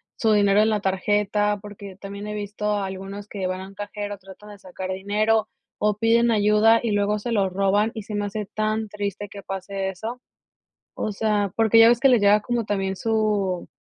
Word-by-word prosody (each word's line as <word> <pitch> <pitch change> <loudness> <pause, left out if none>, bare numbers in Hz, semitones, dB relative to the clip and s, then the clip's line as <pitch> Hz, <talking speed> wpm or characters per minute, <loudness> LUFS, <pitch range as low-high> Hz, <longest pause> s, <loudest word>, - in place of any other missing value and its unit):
su 220 -2 +1
dinero 205 0 +4
en 220 - +3
la 210 -1 +1
tarjeta, 205 +1 0
porque, 200 -2 -10
también 200 +1 -7
he 210 - -4
visto 210 0 -2
algunos 195 +1 -6
que 195 -3 -4
van 185 0 -3
a 190 - -8
un 195 - -14
cajero, 205 0 -6
tratan 195 +2 -14
de 205 - -13
sacar 185 0 -6
dinero, 215 +3 +1 0.3
o 210 -1 +1
piden 230 +1 +3
ayuda 215 +1 +4
y 225 - 0
luego 205 +1 +1
se 235 +3 -5
lo 200 -4 +2
roban 200 +3 +1
y 220 - -5
se 210 - -8
me 205 0 -1
hace 205 +1 -4
tan 215 0 -1
triste 205 0 -4
que 200 0 -10
pase 195 0 -4
eso. 225 +7 -6 0.7
O 215 - -3
sea, 205 -2 0
porque 225 0 +4
ya 225 - +9
ves 240 0 +3
que 270 - +5
les 245 -4 +5
llega 205 +1 +5
como 240 +1 -2
también 195 -2 -2
su, 210 -5 0
205 Hz, 205 wpm, -23 LUFS, 195-215 Hz, 0.7 s, ya